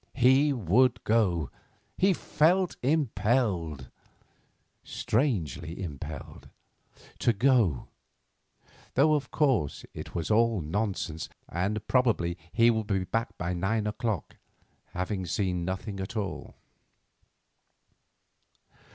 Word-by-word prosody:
He 135 +3 +5
would 120 - +2
go. 90 - +1 0.4
He 195 +1 +3
felt 180 +3 +2
impelled—strangely 105 - -2
impelled—to 75 - -6
go, 110 - +2 1.1
though 155 +4 +5
of 145 -2 -1
course 130 - +1
it - - -8
was 85 +4 -2
all 115 -1 +3
nonsense, 90 -1 -3 0.2
and 100 +5 -2
probably 115 -10 +2 0.2
he 115 +1 +5
would 110 -2 -2
be 95 -3 0
back 115 +5 -3
by 90 +1 -2
nine 105 +5 0
o'clock, 105 - -3 0.6
having 95 +1 -3
seen 90 -2 -1
nothing 95 +3 -4
at 95 +4 -5
all. 100 -4 -4
105 Hz, 90 wpm, -28 LUFS, 90-125 Hz, 1.1 s, He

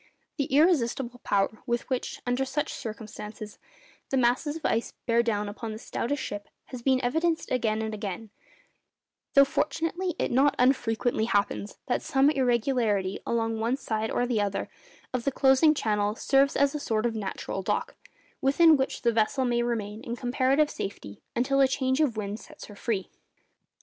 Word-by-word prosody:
The 280 - +1
irresistible 270 -5 +2
power 200 +1 0
with 240 0 -1
which, 255 -2 -3
under 245 +2 +1
such 270 +2 -2
circumstances, 215 -2 -8 0.5
the 270 - +1
masses 255 +5 +2
of 325 - -7
ice 230 +1 0
bear 235 -1 +3
down 210 -3 -1
upon 220 +2 -5
the - - -6
stoutest 265 +4 -3
ship, 205 0 -6 0.2
has 250 - -5
been 260 +1 +3
evidenced 320 +6 0
again 220 -3 0
and 220 0 -3
again; 210 0 -5 1.0
though, 275 0 +8
fortunately, 330 +5 -1
it - - -1
not 275 +4 +4
unfrequently 245 -3 +2
happens 205 -1 -1
that 245 - 0
some 275 +2 +3
irregularity 235 -7 +1
along 225 -1 0
one 235 +4 0
side 220 -4 -2
or 245 - 0
the 240 -4 0
other 200 -1 -2 0.4
of 250 -2 -1
the 275 - +1
closing 270 +4 +4
channel 210 -4 0
serves 275 +3 +3
as 280 0 +3
a 300 - -3
sort 220 -5 -1
of 235 - +1
natural 200 -2 -4
dock, - - -2 0.5
within 310 +3 +5
which 265 0 -2
the 235 -1 +3
vessel 225 +4 +1
may 240 -1 +1
remain 220 -3 -2
in 235 - -4
comparative 265 +4 +2
safety 105 - -6
until 275 +3 +2
a 270 - +6
change 260 +1 0
of 255 -8 +1
wind 210 0 -3
sets - - -12
her 205 - -12
free. 200 -4 -2
240 Hz, 170 wpm, -27 LUFS, 220-270 Hz, 1.0 s, though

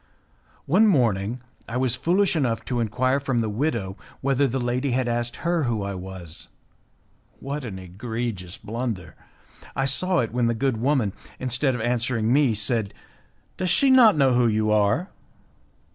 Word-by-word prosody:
One 195 +9 +4
morning 120 - +1 0.3
I 120 - -2
was 130 -2 +1
foolish 180 +6 +1
enough 125 -7 0
to 125 -2 -2
enquire 130 +4 +1
from 135 -3 -2
the 115 -2 0
widow 110 -5 -2 0.2
whether 140 +1 +2
the 130 +1 -2
lady 125 +3 -1
had 125 0 0
asked 120 0 -2
her 170 -3 0
who 115 -4 -1
I 100 0 -3
was. 90 -3 -8 0.9
What 140 +2 -5
an 100 -5 -6
egregious 100 0 -5
blunder! 110 -6 -5 0.6
I 135 - 0
saw 180 +7 +1
it 115 -7 0
when 120 -1 +1
the 115 - 0
good 130 0 0
woman, 125 -5 +1 0.2
instead 130 +1 0
of 120 - -4
answering 120 -1 0
me, 135 -5 +3
said, 110 -1 -1 0.6
"Does 185 -1 -1
she 275 +7 +4
not 235 -8 +7
know 135 -3 +4
who 120 -1 +3
you 110 -1 +1
are?" 105 - +2
120 Hz, 160 wpm, -24 LUFS, 110-135 Hz, 0.9 s, not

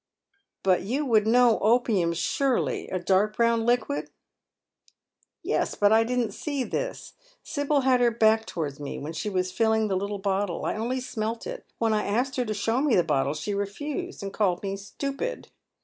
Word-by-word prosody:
" 400 0 -47
But 185 -2 +3
you 265 +9 -1
would 220 -4 +3
know 240 0 +5
opium, 215 -6 +2
surely, 260 +9 0
a 185 - -2
dark 195 +4 +1
brown 230 -1 +2
liquid? 245 +4 0 0.4
" - - -37
" - - -63 0.3
Yes, - - 0
but 205 0 +3
I 220 +1 +5
didn't 240 -2 -1
see 280 +5 -3
this. - - -4 0.3
Sibyl 285 0 0
had 255 -1 +3
her 240 - +5
back 220 -1 +3
towards 150 -5 -4
me 145 -1 -5
while 150 +3 -5
she 165 +6 -3
was 185 -2 -1
filling 220 +2 +2
the 190 - +1
little 200 +2 -2
bottle. 195 -2 -1
I - - 0
only 245 +4 -2
smelt 225 -2 -4
it. - - -7
When 225 -1 +1
I 210 - +1
asked 250 +6 0
her 250 - +1
to 215 - -2
show 225 +5 0
me 290 -5 +3
the 175 - +4
bottle, 145 -2 0
she 180 +7 -3
refused, 290 - -4
and 195 0 -5
called 185 -4 0
me 195 - -2
a - - -4
fitupid. 275 - -5
220 Hz, 195 wpm, -26 LUFS, 195-250 Hz, 0.4 s, know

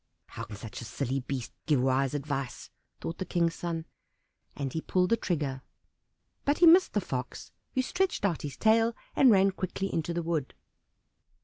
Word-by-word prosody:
"How - - -6
can 105 - -9
such 105 +3 -8
a - - -7
silly 130 +4 -2
beast 130 -2 -5
give 150 -4 +4
wise 130 +2 +2
advice?" 140 -3 -4 0.3
thought 165 - -5
the - - -1
King's 170 -2 +1
son, 165 -2 -4 0.7
and 135 -2 -3
he 160 - -2
pulled 180 +2 +1
the - - +6
trigger. 150 -11 -2 0.8
But 285 +1 +2
he 350 - +6
missed 350 +3 +7
the - - +2
Fox, - - -5 0.2
who 260 - +2
stretched 370 - 0
out 175 -6 0
his 145 -2 -6
tail 225 +1 +4 0.2
and 265 - +6
ran 195 -2 +5
quickly 190 +1 -3
into 165 +1 -1
the 170 0 -2
wood. 160 -5 -2
165 Hz, 180 wpm, -29 LUFS, 135-195 Hz, 0.8 s, missed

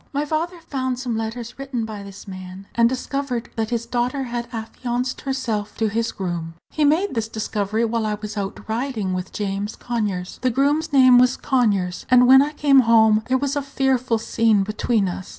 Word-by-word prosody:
"My 285 +1 0
father 330 +4 -2
found 260 -4 -3
some 245 -2 -3
letters 230 +2 -5
written 265 -4 -3
by 215 -2 -7
this 200 +1 -11
man, 185 0 -9
and 235 0 +4
discovered 255 -2 -3
that 220 -1 -1
his 235 -1 -2
daughter 245 +3 -1
had 240 -1 -4
affianced 240 +2 -3
herself 230 -6 -3
to 220 -1 +1
his 230 +2 -1
groom. 170 -4 -4 0.2
He 310 - 0
made 315 +6 +2
this 225 -3 -1
discovery 220 0 -1
while 225 -1 -1
I 210 - -1
was 210 0 -7
out 195 -2 -5
riding 220 -4 -2
with 185 0 -4
James 200 +1 -3
Conyers 205 -7 -3
the 255 - +2
groom's 290 +6 +1
name 255 -3 +7
was 250 +1 +3
Conyers 205 -9 0
and 250 -1 +6
when 265 +2 +8
I 295 +2 -1
came 285 -2 +5
home 220 -3 +5
there 260 +1 +2
was 280 +2 -1
a 285 - 0
fearful 265 -3 0
scene 220 -2 +2
between 215 0 0
us. 180 +1 -5
235 Hz, 190 wpm, -22 LUFS, 210-260 Hz, 0.2 s, when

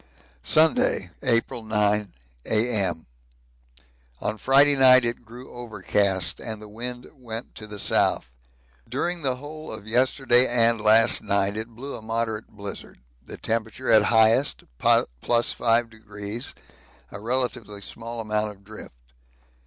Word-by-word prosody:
Sunday, 155 - +2
April 115 -2 +1
9, 105 -1 0 0.4
A.M. 105 -7 +1 1.1
On - - -2
Friday 140 +5 +4
night 130 -2 +6
it 120 +1 -3
grew 120 +3 -12
overcast 100 -6 -1
and 110 -2 -6
the 105 - -11
wind 120 +3 -6
went 120 -4 -8
to 110 - -9
the 105 -1 -9
south. 65 -9 +1 0.6
During 175 0 -2
the 130 -3 0
whole 150 +4 -9
of 110 -2 -7
yesterday 125 +2 +3
and 115 -2 +3
last 110 +1 +5
night 100 0 0
it 110 +1 -4
blew 125 +5 -8
a - - -9
moderate 110 0 -3
blizzard 100 -1 -9 0.2
the - - -10
temperature 115 +2 -2
at 110 -2 +6
highest 115 +4 +3 0.2
+5°, 115 - 0 0.6
a 100 - -8
relatively 120 -2 -1
small 115 +2 -7
amount 105 -1 -1
of 100 -1 -13
drift. 105 - -12
115 Hz, 125 wpm, -24 LUFS, 105-125 Hz, 1.1 s, night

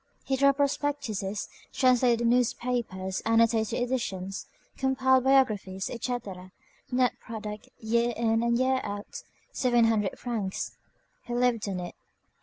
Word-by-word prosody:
He 270 - +1
drew 275 +1 +5
up 275 - +1
prospectuses, 275 -8 -1 0.2
translated 245 -2 +3
newspapers, 235 -5 0
annotated 225 0 +2
editions, 195 -7 -3 0.3
compiled 260 -1 +2
biographies, 215 -8 +2
etc.; 205 -7 -5 0.4
net 250 -1 +1
product, 215 -2 -7
year 235 +1 +1
in 225 -1 +2
and 235 0 +2
year 260 +1 +2
out, 205 0 -6 0.3
seven 240 -3 +3
hundred 215 -3 +1
francs. 215 -6 -3 0.5
He 240 - -4
lived 240 -4 +1
on 185 -2 -3
it. 175 - -6
235 Hz, 120 wpm, -28 LUFS, 210-255 Hz, 0.5 s, drew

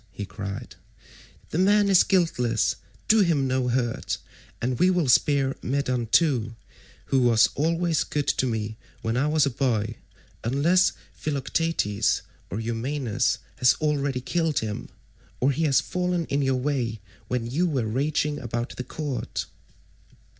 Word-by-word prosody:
he 100 +1 -6
cried, 100 -1 -7 0.7
"the 160 - -1
man 205 +2 +4
is 195 -3 +6
guiltless, 125 - +1 0.3
do 220 - +5
him 165 -8 +3
no 130 -1 0
hurt; 120 -1 -1 0.4
and 125 +1 -2
we 180 +2 +5
will 180 -5 +1
spare 135 +1 +3
Medon 130 -3 -1
too, 120 -5 +2 0.5
who 135 - +2
was 115 -2 +5
always 165 +1 +1
good 145 -1 -2
to 130 - +1
me 110 -2 -3 0.3
when 115 +1 -1
I 135 +4 +2
was 150 -1 +3
a 140 - 0
boy, 115 -4 -1 0.5
unless 160 +10 +3 0.2
Philoetius 140 -7 0 0.3
or 100 - -3
Eumaeus 115 +1 -1 0.2
has 125 - +5
already 140 -4 -1
killed 165 +3 0
him, 105 -2 -3 0.5
or 135 +3 +3
he 160 +4 0
has 140 -3 +4
fallen 180 -2 -1
in 140 - +1
your 135 -1 +1
way 125 -5 -1 0.3
when 125 0 -1
you 150 +10 0
were 135 -8 0
raging 145 +5 0
about 120 0 -4
the 125 - -3
court." 145 -2 -4
135 Hz, 145 wpm, -25 LUFS, 120-155 Hz, 0.7 s, is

